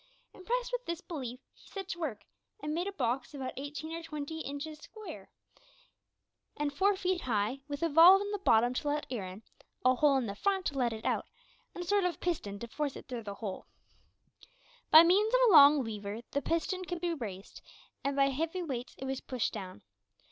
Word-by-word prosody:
Impressed 485 +6 -2
with - - -2
this 340 -1 -2
belief, 260 -10 -6
he - - -20
set 390 -2 -6
to 345 - -4
work 235 -11 -4 0.4
and 300 -4 -3
made 350 +4 -1
a - - -2
box 265 -3 -2
about 265 -2 -4
eighteen 295 +3 -6
or 335 - -4
twenty 320 -1 -6
inches 300 +1 -6
square 430 +6 -10 1.3
and 290 -1 -1
four 395 +6 +3
feet 370 -2 -1
high, 220 +2 0
with 285 +2 -4
a - - +4
valve 335 +5 +8
in 405 +1 -3
the 410 - -2
bottom 240 - +4
to 270 - -3
let 295 +1 0
air 210 -7 -3
in, 190 +4 -10 0.4
a 255 - +6
hole 280 +1 +4
in 260 - 0
the 200 - -4
front 385 - 0
to - - -1
let 245 -3 +1
it 220 -1 -7
out, - - 0 0.5
and 355 - -4
a - - -11
sort 405 0 +3
of 355 -4 -1
piston 255 - -2
to 235 - -7
force 285 +3 -3
it - - -10
through 245 -3 -5
the 200 -2 -7
hole. 200 -3 -6 1.2
By 315 +1 +10
means 415 +7 +4
of - - +5
a - - +5
long 290 -3 +8
lever 210 -1 -5
the 280 - 0
piston 335 +4 -1
could 355 -1 -4
be 345 0 -1
raised, 200 - -7 0.4
and 280 0 -1
by 275 0 +4
heavy 325 +6 -2
weights 255 -6 -5
it 265 - -6
was 265 0 -3
pushed 255 -4 -2
down. 185 -3 -7
290 Hz, 210 wpm, -31 LUFS, 245-350 Hz, 1.3 s, By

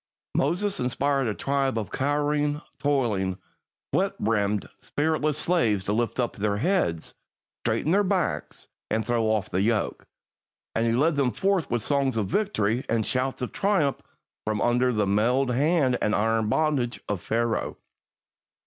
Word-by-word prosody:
Moses 180 +8 0
inspired 135 +1 +1
a 105 - -1
tribe 135 -3 0
of 110 -3 -3
cowering, 145 +1 0 0.2
toiling, 110 -10 0 0.6
sweat - - +1
begrimed, 105 -2 0
spiritless 155 0 0
slaves 120 - +1
to 105 - -1
lift 120 +3 -1
up 120 - 0
their 105 -1 0
heads, 105 - 0 0.5
straighten 115 +8 0
their 200 +3 +4
backs, 185 - -2 0.2
and 110 0 0
throw 120 -2 +1
off 110 -3 0
the 95 - +1
yoke; 110 +1 0 0.7
and 115 +1 +1
he - - +2
led 145 +5 +2
them 135 -3 +2
forth 195 -1 0
with 120 -2 -1
songs 140 -4 +1
of 105 - +1
victory 120 - 0
and 115 -2 +1
shouts 130 0 -1
of 125 - -3
triumph 190 -9 +1 0.5
from 110 -1 -1
under 125 +2 +2
the 105 -3 +1
mailed 120 +7 +2
hand 140 -1 +2
and 105 - +2
iron 110 0 +1
bondage 140 -3 +1
of 100 -4 -2
Pharaoh. 115 0 -1
125 Hz, 150 wpm, -26 LUFS, 110-145 Hz, 0.7 s, their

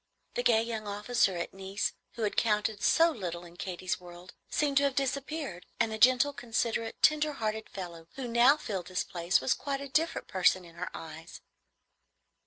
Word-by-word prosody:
The - - 0
gay 225 -2 +4
young 225 -2 -4
officer 205 -2 +1
at 170 - -4
Nice, 195 +1 -2 0.2
who 230 - -4
had 210 - 0
counted 210 -2 +1
so 330 +1 +5
little 175 - -5
in 170 0 -14
Katy's 185 +2 -3
world, 175 0 -12 0.2
seemed 285 -2 +1
to 285 - +5
have 275 -2 0
disappeared, 275 - -2
and 230 -2 +2
the 220 - -4
gentle, 255 +4 +5
considerate, 230 -2 -2
tender 305 0 +4
hearted 220 -3 -3
fellow 170 -4 -8
who 265 -2 -4
now 240 +5 +5
filled 195 - -4
his 185 - -1
place 175 +2 +1
was - - +2
quite 275 -1 -3
a 280 - -6
different 315 +5 0
person 185 -1 +3
in 170 - -14
her 175 +2 -5
eyes. 165 +1 -9
220 Hz, 185 wpm, -30 LUFS, 180-260 Hz, 0.2 s, so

